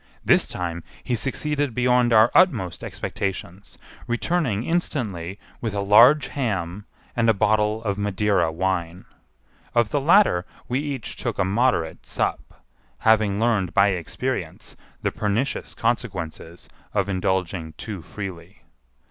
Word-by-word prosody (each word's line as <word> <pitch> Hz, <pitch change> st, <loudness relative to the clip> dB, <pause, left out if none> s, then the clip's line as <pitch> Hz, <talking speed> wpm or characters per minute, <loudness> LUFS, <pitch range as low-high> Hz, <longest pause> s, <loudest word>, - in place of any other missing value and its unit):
This -, -, +4 dB
time 85 Hz, -1 st, -4 dB, 0.2 s
he 125 Hz, -, -2 dB
succeeded 140 Hz, +1 st, -1 dB
beyond 125 Hz, -1 st, +3 dB
our 110 Hz, +1 st, +6 dB
utmost 95 Hz, -, +3 dB
expectations, 95 Hz, 0 st, -5 dB, 0.3 s
returning 120 Hz, -, 0 dB
instantly 105 Hz, -, -2 dB, 0.2 s
with 110 Hz, -4 st, -3 dB
a -, -, -1 dB
large 120 Hz, +9 st, +6 dB
ham 100 Hz, -, -3 dB, 0.3 s
and 115 Hz, -1 st, +2 dB
a 110 Hz, -, +4 dB
bottle 105 Hz, +2 st, +1 dB
of 100 Hz, -2 st, -2 dB
Madeira 100 Hz, -4 st, +1 dB
wine. 90 Hz, 0 st, -2 dB, 0.7 s
Of 120 Hz, -2 st, +3 dB
the 145 Hz, -, +1 dB
latter 155 Hz, -, +4 dB, 0.2 s
we 125 Hz, +2 st, 0 dB
each 140 Hz, -5 st, -5 dB
took -, -, -3 dB
a 100 Hz, -, +2 dB
moderate 95 Hz, -5 st, 0 dB
sup, -, -, -3 dB, 0.3 s
having 110 Hz, -2 st, +3 dB
learned 105 Hz, -8 st, +1 dB
by 100 Hz, +1 st, +5 dB
experience 90 Hz, -4 st, -4 dB, 0.3 s
the -, -, +1 dB
pernicious 110 Hz, +6 st, -2 dB
consequences 90 Hz, -8 st, -3 dB, 0.3 s
of 100 Hz, -2 st, +1 dB
indulging 95 Hz, -3 st, -1 dB
too 105 Hz, -5 st, -7 dB
freely. 95 Hz, 0 st, -8 dB
105 Hz, 125 wpm, -23 LUFS, 95-120 Hz, 0.7 s, our